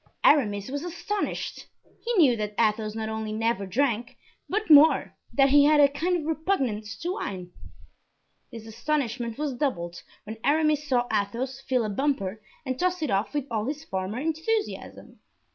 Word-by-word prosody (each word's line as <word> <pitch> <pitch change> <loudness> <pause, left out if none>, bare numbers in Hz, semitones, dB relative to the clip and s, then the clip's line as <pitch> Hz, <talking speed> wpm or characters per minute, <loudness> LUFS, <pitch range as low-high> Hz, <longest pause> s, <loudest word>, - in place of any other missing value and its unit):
Aramis 205 -8 +3
was 285 +2 -3
astonished. 355 +4 -4 0.4
He 480 - -1
knew 300 - +5
that 210 -1 -4
Athos 215 -1 +1
not 220 -1 -3
only 220 0 -4
never 220 -2 -1
drank, 240 +2 -1 0.3
but 430 +3 -1
more, 305 0 +6 0.2
that 275 -1 +4
he 285 +1 +6
had 300 0 +5
a 285 - +8
kind 335 +6 -1
of 315 - -5
repugnance 270 - -1
to 350 +2 -1
wine. 180 - -5 1.0
This 230 -3 -9
astonishment 240 -1 -2
was 295 -2 -2
doubled 175 - -2 0.2
when 220 +1 -7
Aramis 300 0 +2
saw 245 -3 +2
Athos 240 +6 -2
fill 250 -3 +2
a - - -2
bumper 220 -5 -1 0.2
and 260 -1 -3
toss 360 -2 0
it 300 - -1
off 200 +8 0
with 290 -3 -1
all 220 -2 -1
his 300 +2 -4
former 190 +1 -3
enthusiasm. 325 +9 -3
260 Hz, 160 wpm, -26 LUFS, 215-305 Hz, 1.0 s, a